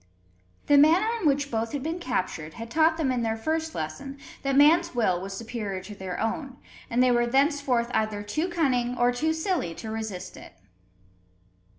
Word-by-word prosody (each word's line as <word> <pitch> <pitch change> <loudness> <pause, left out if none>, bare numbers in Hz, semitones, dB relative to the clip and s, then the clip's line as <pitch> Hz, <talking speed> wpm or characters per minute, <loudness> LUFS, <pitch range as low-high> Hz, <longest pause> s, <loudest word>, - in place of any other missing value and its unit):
The 290 -1 +6
manner 335 +9 +5
in 330 - +2
which 285 0 +1
both 225 0 -2
had 285 -2 -3
been 325 +3 -3
captured, 180 - -3
had 230 0 -8
taught 320 +2 +3
them 295 -5 0
in 250 -2 0
their 225 -1 -1
first 315 +6 -2
lesson, 270 - -5 0.2
that 275 -1 0
man's 325 +3 +5
will 185 -7 +1
was 195 0 -6
superior 220 -4 -4
to 210 - -9
their 190 -3 -6
own; 255 +4 -3 0.3
and 245 +2 +3
they 255 - +4
were 240 0 +2
thenceforth 270 -2 +1
either 215 -1 -1
too 310 - -2
cunning 250 -8 0
or 245 0 +3
too 305 +6 0
silly 320 - -1
to 220 +4 -7
resist 220 -5 -5
it. - - -12
245 Hz, 185 wpm, -26 LUFS, 220-305 Hz, 0.3 s, The